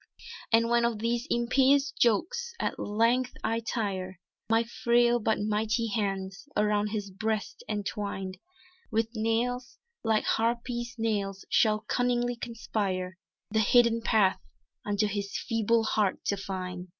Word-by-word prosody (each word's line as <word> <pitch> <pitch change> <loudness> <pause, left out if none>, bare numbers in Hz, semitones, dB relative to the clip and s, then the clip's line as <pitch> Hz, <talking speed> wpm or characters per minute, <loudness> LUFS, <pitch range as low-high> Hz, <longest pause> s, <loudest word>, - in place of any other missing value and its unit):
"And 230 0 +4
when 235 0 +3
of 235 -2 +1
these 235 +4 -1
impious 270 +4 +3
jokes 460 - +1
at - - -2
length 230 +4 +1
I 225 0 0
tire, 190 -5 -3 0.3
My 225 +1 +4
frail 240 +1 +2
but 220 0 +1
mighty 215 +2 0
hands, 195 +2 -3
around 210 0 +2
his 205 -2 -4
breast 215 +2 -3
entwined, 200 -2 -3 0.5
With 225 +1 0
nails, 240 +3 -1 0.3
like 220 -2 +2
harpies' 235 +1 -1
nails, 200 -4 -2
shall 215 -1 +3
cunningly 245 +1 0
conspire 195 -6 -3 0.3
The 220 - +2
hidden 230 +1 +4
path 210 -4 +3 0.4
unto 205 +1 +1
his 200 -1 -3
feeble 225 -1 +1
heart 210 -3 0
to 200 - +1
find." 185 -2 -5
225 Hz, 125 wpm, -29 LUFS, 205-235 Hz, 0.5 s, And